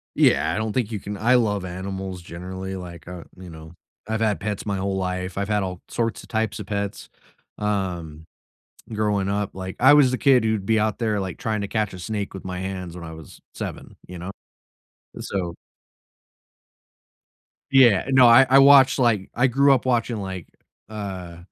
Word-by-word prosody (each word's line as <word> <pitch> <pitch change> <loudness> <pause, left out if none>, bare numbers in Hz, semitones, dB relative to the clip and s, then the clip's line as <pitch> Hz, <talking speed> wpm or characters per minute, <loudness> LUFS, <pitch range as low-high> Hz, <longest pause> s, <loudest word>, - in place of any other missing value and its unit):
Yeah, - - +3
I - - -2
don't 110 -1 -2
think 120 -2 -1
you 105 - -3
can 100 +2 -6
I 120 +6 +3
love 105 -5 +1
animals 95 0 -6
generally, 95 +2 -7
like, 85 -3 -9
uh, 90 -1 -8
you 90 -1 -10
know, 80 +1 -12 0.3
I've 110 0 -2
had 110 -2 +1
pets 105 -1 -4
my 100 -2 -2
whole 95 0 -2
life. 90 0 -3
I've 100 0 -1
had 105 -1 0
all 90 -1 -5
sorts 115 -8 -2
of - - -15
types 110 -2 -1
of - - -6
pets, 100 -1 -4 0.5
um, 90 -7 -3 0.7
growing 105 -2 0
up, 100 0 -1
like, 95 0 -6
I 135 +3 +7
was 145 -4 +6
the 130 - -1
kid 130 -4 +4
who'd 110 -3 -1
be 110 +1 +2
out 105 -1 -1
there, 110 -3 0
like, 95 -2 -5
trying 110 -2 -2
to 100 - -3
catch 110 -3 -1
a 90 - -8
snake 105 +2 -4
with 95 - -8
my 90 -1 -4
hands 95 -2 -5
when 85 - -8
I 80 - -8
was 80 -3 -13
7, - - -7
you 90 0 -9
know? 90 +3 -6 0.9
Eh, - - -7
so 90 -4 -4 2.2
Yeah, 125 -7 +6
eh, - - -3
no, 130 -2 +7
I 120 +3 +8
I 135 +1 +7
watched, 135 -1 +7
like 110 -6 +2
I 125 +2 +3
grew 140 +3 +4
up 130 - 0
watching, 120 -2 0
like, 95 -3 -6 0.4
uh, 95 -5 -7
100 Hz, 195 wpm, -23 LUFS, 90-110 Hz, 2.2 s, I